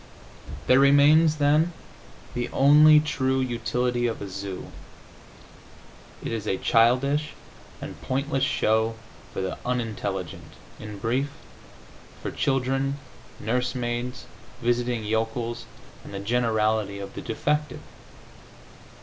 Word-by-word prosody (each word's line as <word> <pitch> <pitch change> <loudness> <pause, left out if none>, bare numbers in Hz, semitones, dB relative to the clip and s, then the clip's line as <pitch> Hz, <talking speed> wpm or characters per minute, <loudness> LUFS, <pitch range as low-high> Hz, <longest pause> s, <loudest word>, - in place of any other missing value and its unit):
There 130 +1 +5
remains, 145 +3 +6
then, 150 +3 +2 0.6
the 120 0 -2
only 150 +2 +7
true 130 -3 0
utility 120 0 0
of 115 - -3
a 100 - -6
zoo: 95 0 -6 1.5
it - - -4
is 110 -2 -4
a 95 - 0
childish 135 +9 +2 0.5
and - - -8
pointless 135 +1 -1
show 110 -4 +1 0.4
for - - -4
the 95 -1 -4
unintelligent, 105 -7 -4 0.3
in 105 -1 -8
brief, 125 +7 -1 0.9
for - - -5
children, 135 +1 0 0.4
nursemaids, 125 +1 -2 0.3
visiting 120 -1 0
yokels 115 +2 -2 0.4
and - - -9
the - - -3
generality 110 -2 0
of 100 -1 -7
the - - -6
defective. 150 +6 -2
120 Hz, 105 wpm, -25 LUFS, 110-135 Hz, 1.5 s, only